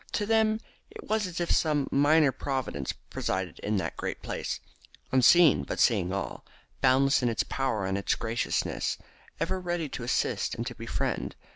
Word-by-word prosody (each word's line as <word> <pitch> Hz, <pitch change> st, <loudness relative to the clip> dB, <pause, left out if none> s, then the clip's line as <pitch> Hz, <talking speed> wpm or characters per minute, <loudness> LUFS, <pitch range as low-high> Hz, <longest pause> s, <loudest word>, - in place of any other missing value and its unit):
To 210 Hz, -, 0 dB
them 220 Hz, 0 st, +3 dB, 0.3 s
it 435 Hz, -1 st, -11 dB
was 215 Hz, -2 st, +1 dB
as 175 Hz, -2 st, -5 dB
if 175 Hz, -, -1 dB
some 150 Hz, -3 st, +2 dB
minor 145 Hz, +1 st, +4 dB
Providence 130 Hz, -, -3 dB, 0.2 s
presided 95 Hz, -3 st, -2 dB
in 105 Hz, 0 st, -1 dB
that 95 Hz, -, -3 dB
great -, -, -4 dB
place, -, -, -3 dB, 0.5 s
unseen 130 Hz, -, +6 dB
but 70 Hz, -, -5 dB
seeing 90 Hz, -, +3 dB
all, 100 Hz, -, -4 dB, 0.4 s
boundless 135 Hz, +2 st, +4 dB
in 120 Hz, -, +2 dB
its 115 Hz, -, 0 dB
power 130 Hz, -7 st, -1 dB
and 95 Hz, +1 st, -1 dB
its 100 Hz, -, +1 dB
graciousness, 115 Hz, +1 st, -1 dB, 0.4 s
ever 190 Hz, -, -1 dB
ready 175 Hz, -3 st, -2 dB
to 125 Hz, -, -6 dB
assist 120 Hz, -, 0 dB
and 115 Hz, -, -4 dB
to 120 Hz, -, -4 dB
befriend. 115 Hz, 0 st, -3 dB
135 Hz, 165 wpm, -28 LUFS, 115-170 Hz, 0.5 s, unseen